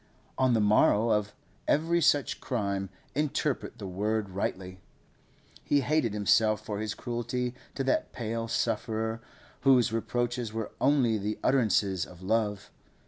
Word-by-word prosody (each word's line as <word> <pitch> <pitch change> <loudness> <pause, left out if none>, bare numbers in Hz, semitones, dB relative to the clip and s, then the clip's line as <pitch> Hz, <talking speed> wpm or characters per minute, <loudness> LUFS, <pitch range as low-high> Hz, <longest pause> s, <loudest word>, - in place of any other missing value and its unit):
On 130 -2 +3
the - - +3
morrow 105 +1 +4
of 105 -1 +1 0.4
every 165 +3 +2
such 145 -3 +2
crime—interpret 120 +7 -2
the 100 - -7
word 105 +3 -1
rightly—he 95 +8 -5
hated 135 -6 +1
himself 110 +1 +2
for 105 -1 -3
his 110 -1 -3
cruelty 120 +1 -3 0.2
to 135 - -1
that 130 - 0
pale 115 -1 -3
sufferer 110 0 -1 0.4
whose 125 -4 +4
reproaches 120 0 -1
were 110 -1 -4
only 130 -6 +3
the 105 +2 -3
utterances 105 -8 +2
of 90 0 -14
love. 105 -1 -1
110 Hz, 125 wpm, -29 LUFS, 105-125 Hz, 0.4 s, morrow